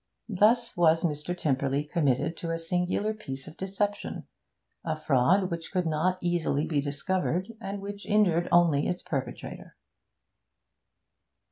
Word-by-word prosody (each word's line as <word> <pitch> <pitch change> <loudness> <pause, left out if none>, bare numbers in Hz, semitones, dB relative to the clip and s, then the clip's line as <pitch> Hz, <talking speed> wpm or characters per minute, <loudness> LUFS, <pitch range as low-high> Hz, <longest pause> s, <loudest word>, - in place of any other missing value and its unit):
Thus 225 +4 +3
was 165 -1 +4
Mr. 160 +2 -2
Tymperley 140 -2 0
committed 150 -1 0
to 170 - -4
a 165 - 0
singular 180 +5 -1
piece 135 -11 -7
of 155 - -10
deception, 200 +2 -3 0.6
a 160 -1 -1
fraud 160 +7 +3
which 165 -1 -5
could 180 -2 0
not 165 +4 +1
easily 170 -4 0
be 150 -3 0
discovered, 180 +7 -1
and 200 -1 -4
which 200 0 -7
injured 180 -5 +3
only 165 -5 +4
its 180 - -2
perpetrator. 130 -4 -5
170 Hz, 130 wpm, -28 LUFS, 150-190 Hz, 0.6 s, was